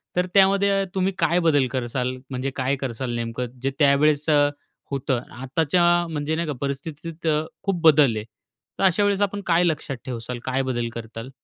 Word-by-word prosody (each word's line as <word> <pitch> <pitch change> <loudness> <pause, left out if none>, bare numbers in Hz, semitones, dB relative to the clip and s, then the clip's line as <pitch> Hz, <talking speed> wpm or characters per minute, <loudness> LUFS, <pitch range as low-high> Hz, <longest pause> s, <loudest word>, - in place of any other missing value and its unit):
तर 180 0 +2
त्यामध्ये 195 0 +4
तुम्ही 190 +1 +1
काय 175 - +2
बदल 155 -6 +3
करसाल? 125 0 -2
म्हणजे 130 0 -2
काय 130 +1 0
करसाल 130 -2 -4
नेमकं? 120 +2 -4
जे 135 - +1
त्यावेळेस 145 +1 +3
अ, 145 -1 +4 0.4
होतं 135 -2 -1 0.2
आताच्या 150 +6 +1 0.3
म्हणजे 155 0 -2
नाही 170 0 -2
का 150 - -1
परिस्थितीत 155 +4 -5 0.4
खूप 195 -4 -1
बदल 150 -7 +5
आहे. 105 - -3 0.6
तर - - 0
अशा 190 +1 +4
वेळेस 205 0 +1
आपण 205 0 0
काय 170 0 +3
लक्षात 155 -5 -1
ठेवसाल? 120 -1 -5
काय 130 +1 0
बदल 120 -3 -2
करताल? 115 +1 -7
145 Hz, 170 wpm, -23 LUFS, 130-170 Hz, 0.6 s, बदल